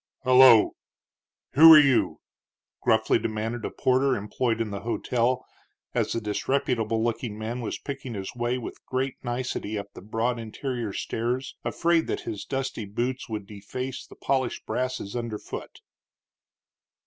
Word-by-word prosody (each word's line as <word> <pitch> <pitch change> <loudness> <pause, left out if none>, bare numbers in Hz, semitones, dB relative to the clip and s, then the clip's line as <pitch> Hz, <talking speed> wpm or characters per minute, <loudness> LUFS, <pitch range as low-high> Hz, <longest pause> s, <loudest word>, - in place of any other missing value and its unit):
"Hullo! 130 -3 +7 0.8
who 160 +4 +9
are - - +10
you?" 135 -4 +3 0.6
gruffly - - +3
demanded 110 +1 -3
a - - -2
porter 130 +1 +2
employed 115 +3 -1
in 110 -2 -2
the 100 - -4
hotel, 120 +3 0 0.5
as - - 0
the 115 - 0
disreputable 115 0 0
looking 115 -2 -2
man 115 +3 -4
was 115 - -3
picking 135 -4 -6
his 95 +2 -5
way 120 +1 -1
with 125 - -8
great 130 0 -2
nicety 120 -4 -3
up 100 0 -7
the - - -10
broad 115 +3 -1
interior 115 0 -4
stairs, 120 +6 -3
afraid 170 -1 +1
that - - -2
his 105 -2 -5
dusty 135 -5 -3
boots 120 +6 -3
would 105 -2 -4
deface 120 +6 -6
the - - -14
polished 130 -3 -1
brasses 125 -4 -3
under 115 -3 -3
foot. - - -8
120 Hz, 145 wpm, -26 LUFS, 110-130 Hz, 0.8 s, are